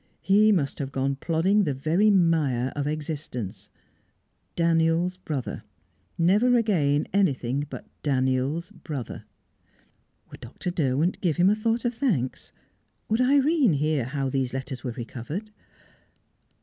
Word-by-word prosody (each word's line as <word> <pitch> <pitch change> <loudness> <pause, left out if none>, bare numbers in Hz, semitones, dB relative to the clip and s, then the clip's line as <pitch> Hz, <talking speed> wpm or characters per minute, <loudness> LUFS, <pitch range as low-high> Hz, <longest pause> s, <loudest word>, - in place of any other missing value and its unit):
He 210 +3 +5
must 150 -9 0
have 135 -2 -4
gone 135 +1 -1
plodding 175 +7 +2
the 145 -6 -1
very 165 +10 +2
mire 155 - +2
of 145 0 -2
existence 145 - -5 0.9
Daniel's 165 +1 +2
brother, 150 -8 -5 0.5
never 210 +9 +4
again 150 -11 +2
anything 140 -7 +1
but - - -8 0.2
Daniel's 135 +5 0
brother. 145 - -7 1.1
Would - - -11
Dr. 180 - -5
Derwent 155 +1 0
give 170 -5 0
him 180 +3 +5
a - - +3
thought 225 +2 -1
of 240 - +1
thanks? 210 - -1 0.6
Would 220 +3 +2
Irene 275 - +4
hear 150 -2 0
how 135 +1 -2
these 130 -1 -1
letters 130 -1 -5
were 130 - -3
recovered? 135 - -6
155 Hz, 125 wpm, -26 LUFS, 135-195 Hz, 1.1 s, He